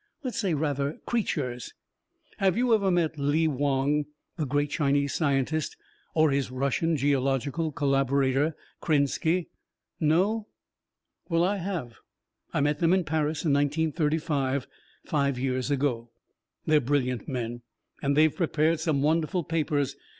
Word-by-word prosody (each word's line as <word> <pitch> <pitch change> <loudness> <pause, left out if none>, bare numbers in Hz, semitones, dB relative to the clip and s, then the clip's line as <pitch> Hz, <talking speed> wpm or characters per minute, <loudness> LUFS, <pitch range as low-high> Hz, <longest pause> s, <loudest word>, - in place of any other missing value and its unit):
"Let's 255 -3 -3
say, 190 -7 +1
rather, 145 -1 -1
creatures. 140 - -2 0.6
Have 190 -1 +2
you 245 -1 +3
ever 200 -3 +3
met 165 -4 +1
Lee 145 +3 +2
Wong, 145 +1 +1 0.3
the 155 -5 -2
great 145 +2 0
Chinese 140 -1 +1
scientist, 145 0 0 0.4
or 155 -2 +4
his 140 -1 0
Russian 140 +5 0
geological 140 +3 0
collaborator, 140 +1 +1 0.3
Krenski? 160 +3 +1 0.5
No? 195 +8 +2 0.8
"Well, 165 0 +2
I 200 +3 +1
have. 170 -11 -4 0.5
I - - 0
met 145 +1 +1
them 170 +1 +3
in 190 -1 +3
Paris 155 0 -1
in 150 - +3
1935 150 -2 0 0.4
five 140 -3 0
years 130 0 -1
ago. 130 -5 0 0.6
They're 155 -1 +4
brilliant 130 -2 -1
men, 120 -3 -4 0.4
and 140 0 +1
they've 155 -1 +4
prepared 160 -2 +1
some 155 -3 0
wonderful 165 +3 +1
papers. 150 -4 -1
145 Hz, 130 wpm, -27 LUFS, 140-160 Hz, 0.8 s, or